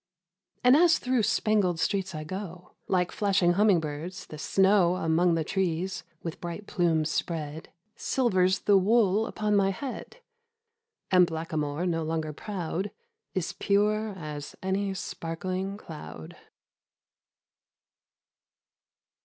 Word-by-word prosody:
And 250 +2 +7
as 340 +2 +6
through 255 -1 +1
spangled 205 -4 +2
streets 190 -1 -1
I 155 - -4
go, 180 +1 -7
Like 180 -2 +1
flashing 195 -4 +2
humming 200 -1 +4
birds, 160 +5 -6
the 155 - -10
snow 190 +2 +3
Among 170 0 +2
the 165 - 0
trees, 185 +1 -1 0.2
with 165 -1 -6
bright 175 +4 -5
plumes 165 -5 +1
spread, 160 -2 -3 0.3
Silvers 190 -7 +1
the 200 -2 +5
wool 215 +1 +3
upon 210 -1 0
my 195 -1 +4
head, 265 - -6 0.9
And 180 -2 +6
Blackamoor, 160 -1 -2
no 165 -2 0
longer 160 -1 -2
proud, 185 +2 -4 0.5
Is 185 -3 -1
pure 210 +1 +1
as 150 -3 -7
any 195 +1 0
sparkling 185 +3 -4
cloud 80 - -9
185 Hz, 115 wpm, -28 LUFS, 165-200 Hz, 0.9 s, And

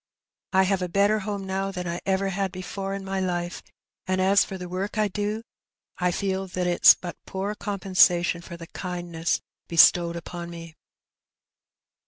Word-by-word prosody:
I 190 0 +5
have 190 0 +1
a 180 - -2
better 200 +4 +3
home 200 -1 -4
now 190 +1 -2
than 180 -2 -5
I 170 0 -3
ever 195 0 +1
had 195 0 -1
before 195 +1 -5
in 195 -1 -6
my 195 0 -2
life, 175 -1 -2 0.5
and 185 0 0
as 195 +2 +5
for 190 - -6
the 180 -1 -7
work 190 +5 -4
I 215 -1 +3
do, 210 +3 -3 0.6
I 180 0 +2
feel 190 +1 -2
that 180 0 -2
it's 175 0 +7
but 175 -1 -9
poor 195 +2 -3
compensation 185 -4 +2
for 170 0 -9
the 165 - -9
kindness 175 -2 -3 0.3
bestowed 170 0 +5
upon 170 0 -6
me." 165 -2 -9
185 Hz, 170 wpm, -25 LUFS, 175-195 Hz, 0.6 s, it's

